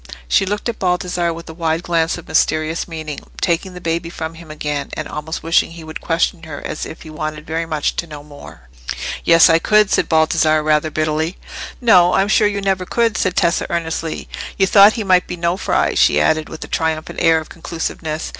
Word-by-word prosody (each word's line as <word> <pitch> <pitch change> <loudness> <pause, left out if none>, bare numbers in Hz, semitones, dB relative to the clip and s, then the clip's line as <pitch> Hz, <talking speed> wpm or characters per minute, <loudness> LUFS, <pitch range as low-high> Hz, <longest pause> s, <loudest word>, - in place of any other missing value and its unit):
She 190 - +2
looked 205 +3 -2
at 235 - -4
Baldassarre 180 -1 0
with 165 0 -8
a 160 - -8
wide 165 0 -1
glance 165 -1 0
of 175 - -11
mysterious 155 +2 0
meaning, 155 -3 -6 0.2
taking 180 +2 -1
the - - -7
baby 170 0 -2
from 160 -1 -6
him 165 -1 -13
again, 150 -2 -4
and 155 - -4
almost 150 +2 -5
wishing 165 0 +2
he 165 -1 -10
would 160 0 -8
question 165 +1 0
her 155 -3 -8
as - - -4
if 155 - -10
he 160 - -10
wanted 155 0 -5
very 165 +1 -3
much 155 -2 -1
to 170 - -2
know 150 -2 -9
more. 145 - -13 0.6
"Yes, 165 -1 +7
I 165 0 +4
could," 210 +2 +3
said - - +1
Baldassarre, 155 -1 +3
rather 155 0 +2
bitterly. 155 +3 -1 0.4
"No, 180 -8 +5
I'm 195 +1 +2
sure 215 0 +4
you 200 -1 -2
never 190 -1 0
could," 230 +3 0
said 185 -1 0
Tessa, 170 -1 +1
earnestly. 165 -1 -3 0.3
"You 195 - +4
thought 200 +2 +7
he 225 - -3
might 185 -2 +3
be 180 - -5
Nofri," 170 +2 0
she 75 - +4
added, 155 - +1
with 160 - -8
a - - -9
triumphant 160 -1 -2
air 165 0 +5
of 155 - -10
conclusiveness. 160 -1 -5
165 Hz, 205 wpm, -18 LUFS, 155-180 Hz, 0.6 s, Yes